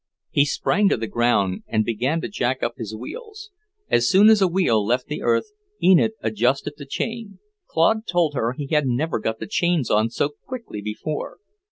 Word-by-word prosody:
He 145 - +4
sprang 195 +7 +1
to - - +1
the 115 - -3
ground 110 -5 +1
and 110 -1 0
began 125 +8 -1
to - - -3
jack 130 -10 -2
up 120 - 0
his 110 -2 -6
wheels. 415 - -9 0.4
As 120 0 +2
soon 205 +3 +6
as 220 -2 +5
a 190 - +5
wheel 170 - +2
left 125 +4 0
the 150 - -5
earth, 325 - +1 0.3
Enid 190 +4 +4
adjusted 120 +6 0
the 140 - -10
chain. 225 +6 -4 0.3
Claude 220 +7 +2
told 175 -4 +1
her 120 -3 -1
he 145 +2 -5
had 150 0 +1
never 130 +3 0
got 110 +1 -2
the - - -6
chains 175 - 0
on 110 +2 +3
so 130 +4 -1 0.2
quickly 235 - -6
before. 105 +9 -5
145 Hz, 190 wpm, -22 LUFS, 115-190 Hz, 0.4 s, soon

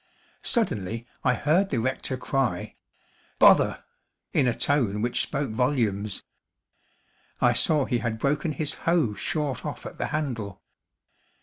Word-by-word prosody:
Suddenly 115 - -1 0.2
I 125 -2 +3
heard 175 +10 +2
the - - -1
rector 130 +2 -1
cry, 125 -7 -1 0.6
"Bother!" - - +5 0.5
in 130 - +3
a 120 - 0
tone 120 - +1
which 120 0 +1
spoke 140 -4 -2
volumes. 110 -5 0 1.2
I - - +4
saw 150 -4 +3
he 125 -3 0
had 110 0 -2
broken 145 +5 0
his 150 +1 -2 0.2
hoe 165 -11 +3
short 150 - -2
off - - -6
at - - -8
the - - -1
handle. 115 -10 -3
125 Hz, 130 wpm, -26 LUFS, 110-145 Hz, 1.2 s, Bother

